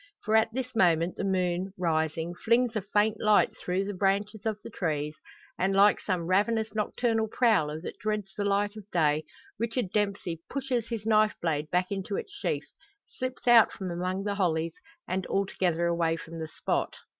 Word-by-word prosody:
For 215 - +1
at 220 0 +4
this 255 0 -4
moment 170 -4 +3
the - - -4
moon, 185 -1 0
rising, 160 -1 0
flings 235 +5 +2
a 215 - 0
faint 210 +2 +1
light 215 -1 +4
through 185 +2 -2
the 205 - -3
branches 200 +2 0
of 215 -2 -1
the - - -8
trees; 150 -3 -2 0.4
and 195 +1 +1
like 200 +1 +6
some 180 -4 -2
ravenous 215 +4 +1
nocturnal 220 +1 0
prowler 210 -11 +2
that - - -7
dreads 210 -2 -2
the 205 - -2
light 205 +1 +1
of 210 -2 -11
day, 155 -3 +2 0.3
Richard 230 -3 -1
Dempsey 200 -5 -1
pushes 255 -4 -2
his 230 -3 -4
knife 215 -1 +4
blade 155 -2 -1
back 180 +2 0
into 195 0 -3
its 410 - -5
sheath, 405 - -3 0.4
slips 255 -1 -6
out 235 -2 +7
from 185 -2 -5
among 185 +3 -2
the 205 0 -1
hollies, 165 -4 0 0.3
and 185 0 -2
altogether 180 -3 0
away 170 -1 +1
from 165 0 -8
the 160 - -4
spot. - - -2
195 Hz, 180 wpm, -28 LUFS, 175-215 Hz, 0.4 s, out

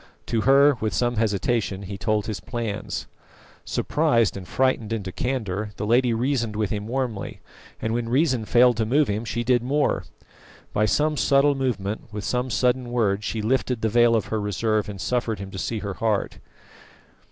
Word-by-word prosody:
To 115 - 0
her, 140 +1 +5
with 110 -1 -1
some 120 -1 0
hesitation, 105 -1 0
he 100 +1 -6
told 105 0 0
his 110 -2 -4
plans. 115 -4 -4 0.6
Surprised 130 -9 +1
and 95 -2 -8
frightened 130 -4 0
into 100 -4 -3
candour, 105 -4 -3
the 105 - -4
lady 120 +3 +3
reasoned 115 -2 0
with 105 -2 -1
him 105 0 -3
warmly, 120 -4 -3 0.4
and 110 - -2
when 115 -1 -2
reason 130 -3 +2
failed 120 +1 +4
to 110 - +1
move 145 +4 +3
him 105 +3 -2
she 120 +1 -2
did 120 0 +3
more. 140 +4 0 0.7
By 105 +1 +2
some 150 +9 +1
subtle 140 +1 +4
movement, 115 -6 -3
with 105 -1 -5
some 125 +3 -1
sudden 125 +2 +1
word, 105 -4 +1
she 110 0 -3
lifted 125 0 0
the 110 - +2
veil 120 +1 +4
of 110 -5 0
her 110 - 0
reserve 105 +1 0
and 100 -2 -7
suffered 115 +1 -1
him 95 0 -8
to 95 - -6
see 115 - -2
her 100 -2 -4
heart. 105 +2 -1
115 Hz, 180 wpm, -24 LUFS, 105-125 Hz, 0.7 s, her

